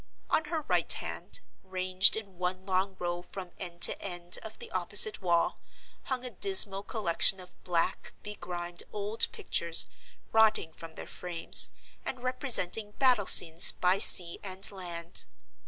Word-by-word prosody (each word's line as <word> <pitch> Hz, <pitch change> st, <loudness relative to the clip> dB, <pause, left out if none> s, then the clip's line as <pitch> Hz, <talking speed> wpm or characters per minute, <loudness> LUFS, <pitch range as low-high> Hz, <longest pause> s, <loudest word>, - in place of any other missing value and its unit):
On 315 Hz, -, +1 dB
her 325 Hz, -2 st, -5 dB
right -, -, 0 dB
hand, -, -, -6 dB, 0.2 s
ranged 185 Hz, 0 st, +2 dB
in 200 Hz, -5 st, -10 dB
one 185 Hz, +1 st, -5 dB
long 190 Hz, 0 st, -3 dB
row 175 Hz, -1 st, -5 dB
from 180 Hz, 0 st, -11 dB
end 175 Hz, -2 st, -6 dB
to -, -, +3 dB
end 175 Hz, -2 st, -4 dB
of 220 Hz, 0 st, -11 dB
the -, -, -11 dB
opposite 205 Hz, +4 st, +2 dB
wall, 170 Hz, -2 st, -1 dB, 0.5 s
hung 255 Hz, -1 st, -4 dB
a 250 Hz, -, -6 dB
dismal 235 Hz, -, +5 dB
collection 195 Hz, -3 st, 0 dB
of 180 Hz, -1 st, -15 dB
black, 175 Hz, +1 st, -3 dB
begrimed 175 Hz, -4 st, -6 dB
old 210 Hz, +2 st, -2 dB
pictures, 170 Hz, -1 st, -2 dB, 0.5 s
rotting 220 Hz, -7 st, +1 dB
from 165 Hz, 0 st, -13 dB
their -, -, -9 dB
frames, 175 Hz, -2 st, +1 dB, 0.3 s
and 250 Hz, -2 st, -7 dB
representing 225 Hz, -5 st, -1 dB
battle 250 Hz, -7 st, 0 dB
scenes 165 Hz, +1 st, +8 dB
by 185 Hz, +2 st, -1 dB
sea 175 Hz, -4 st, +4 dB
and 190 Hz, +1 st, -1 dB
land. 175 Hz, -3 st, -7 dB
185 Hz, 145 wpm, -28 LUFS, 175-210 Hz, 0.5 s, scenes